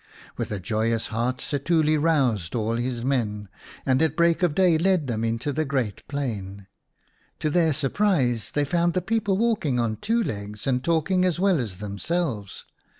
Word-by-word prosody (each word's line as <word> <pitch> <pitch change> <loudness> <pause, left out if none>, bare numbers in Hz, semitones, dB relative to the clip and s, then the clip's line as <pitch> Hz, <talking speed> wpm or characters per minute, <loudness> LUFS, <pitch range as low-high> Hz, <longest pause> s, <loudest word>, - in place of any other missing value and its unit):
With - - -4
a 105 - -2
joyous 110 +4 -1
heart 120 +3 0
Setuli 155 +2 +1
roused 135 - +1
all 115 0 0
his 120 0 -2
men, 105 -7 -1 0.4
and 130 +1 +2
at 160 -2 +2
break 170 0 +3
of 175 -5 +2
day 180 -4 +4
led 185 -3 +2
them 115 -3 -2
into 115 +5 -1
the 155 +3 0
great 130 -8 -2
plain. 105 -9 -4 0.7
To 155 - -1
their 165 -1 +3
surprise 140 - +1
they 145 0 0
found 170 +4 +1
the 185 - +2
people 205 -2 0
walking 205 - +1
on 110 -2 0
two 230 - 0
legs 105 - -5
and 125 -1 0
talking 170 +3 +2
as 180 -2 +1
well 190 -4 +3
as 105 -7 -4
themselves. 105 - -3
135 Hz, 170 wpm, -25 LUFS, 115-170 Hz, 0.7 s, day